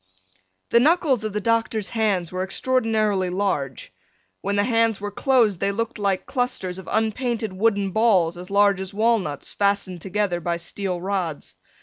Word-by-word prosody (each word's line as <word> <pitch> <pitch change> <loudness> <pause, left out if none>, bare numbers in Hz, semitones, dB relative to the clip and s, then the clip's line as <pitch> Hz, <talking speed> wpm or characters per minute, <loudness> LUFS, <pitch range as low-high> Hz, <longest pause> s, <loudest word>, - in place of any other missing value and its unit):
The 235 - +6
knuckles 290 -4 +3
of 215 - -2
the 210 - -2
doctor's 225 -1 0
hands 205 -7 0
were 185 0 -3
extraordinarily 215 -3 +1
large. 165 - -2 0.5
When 200 +1 -1
the 205 - +3
hands 230 -2 +2
were 205 0 -4
closed 225 -5 +2
they 200 +2 +1
looked 230 +2 -3
like 195 -2 0
clusters 220 -8 -2
of 185 - -10
unpainted 220 -1 -1
wooden 200 -1 +1
balls 190 -6 +3
as 180 +1 -9
large 200 -1 +3
as 190 +1 -7
walnuts 215 -10 0
fastened 200 -3 0
together 190 -2 -1
by 170 0 -1
steel 180 +1 -3
rods. 180 -5 -3
200 Hz, 155 wpm, -23 LUFS, 185-225 Hz, 0.5 s, The